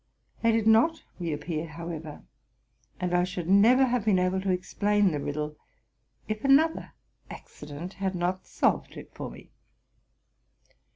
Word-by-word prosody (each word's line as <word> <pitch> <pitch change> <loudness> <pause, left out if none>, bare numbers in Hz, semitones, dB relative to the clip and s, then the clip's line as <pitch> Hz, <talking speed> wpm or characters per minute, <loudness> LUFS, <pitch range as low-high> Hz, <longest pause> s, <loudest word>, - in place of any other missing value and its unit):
They 230 - +4
did 225 -1 +1
not 230 +9 +4 0.2
re 170 -2 -2
appear, 155 +2 -4
however; 160 -1 -7 0.8
and 180 -1 -2
I 175 0 +3
should 180 -2 -4
never 225 +8 +6
have 245 -3 0
been 205 -3 +3
able 185 +1 +1
to 195 - -2
explain 200 +2 +1
the 150 - -2
riddle 150 +1 -4 0.7
if 215 0 -4
another 290 +4 +3 0.4
accident 150 +5 -9
had 190 -1 -3
not 180 +2 -2
solved - - 0
it - - -11
for - - -6
me. - - -14
185 Hz, 140 wpm, -27 LUFS, 165-215 Hz, 0.8 s, never